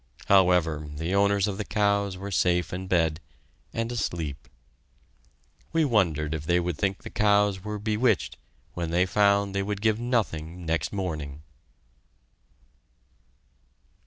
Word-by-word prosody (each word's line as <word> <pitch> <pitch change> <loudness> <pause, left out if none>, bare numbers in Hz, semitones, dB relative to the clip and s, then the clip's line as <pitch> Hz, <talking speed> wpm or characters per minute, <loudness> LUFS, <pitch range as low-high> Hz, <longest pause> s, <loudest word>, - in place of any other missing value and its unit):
However, 90 -6 +3
the 80 +5 -3
owners 100 0 +3
of 100 0 -4
the - - -1
cows 100 -2 0
were 100 +2 -6
safe 90 -2 +1
in 95 +1 -4
bed, 80 -3 +1 0.5
and 115 +1 -3
asleep. 85 - -3 1.3
We 165 -1 +3
wondered 80 - +1
if 80 -2 -4
they 90 0 +3
would 90 -2 -2
think 95 +4 -2
the - - -8
cows 105 -2 +2
were 105 0 -4
bewitched 110 +4 0 0.4
when 85 -2 -3
they 85 +2 +2
found 100 +1 +2
they 100 - 0
would 100 0 -3
give 110 +1 +1
nothing 90 -9 -2
next 80 +1 -1
morning! 75 -7 -4
95 Hz, 130 wpm, -26 LUFS, 85-105 Hz, 1.3 s, However